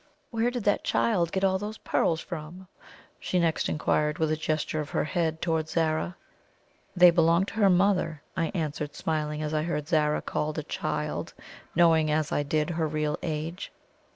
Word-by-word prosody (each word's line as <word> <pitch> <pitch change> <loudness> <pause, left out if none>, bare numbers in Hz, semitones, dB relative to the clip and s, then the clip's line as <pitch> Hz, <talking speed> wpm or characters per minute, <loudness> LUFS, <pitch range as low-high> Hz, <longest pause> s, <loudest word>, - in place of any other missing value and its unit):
"Where 230 0 +1
did 245 -3 -4
that 205 0 +2
child 180 -8 +1
get 190 - -1
all 190 -1 +3
those 210 +2 -5
pearls 165 -1 0
from?" 170 +3 -8 0.5
she 185 - -1
next 165 -2 +1
inquired, 150 0 0
with 160 -1 +1
a - - +2
gesture 155 0 -2
of 150 -1 -4
her - - 0
head 160 -1 -1
towards 160 -2 -1
Zara. 160 +1 0 0.8
"They 180 -1 +8
belonged 170 +3 +3
to - - -10
her 200 - +6
mother," 180 -5 +2
I 165 -3 0
answered, 150 -3 -3
smiling 155 -1 -2
as 150 0 -3
I 155 - +1
heard 150 -2 -2
Zara 150 -2 +1
called 155 +1 -2
a 155 - -2
CHILD, - - -3 0.4
knowing, 165 -2 +4
as 150 0 0
I - - +1
did, 150 +3 0
her 160 -1 0
real 150 0 -1
age. 160 +2 -4
160 Hz, 180 wpm, -27 LUFS, 155-175 Hz, 0.8 s, They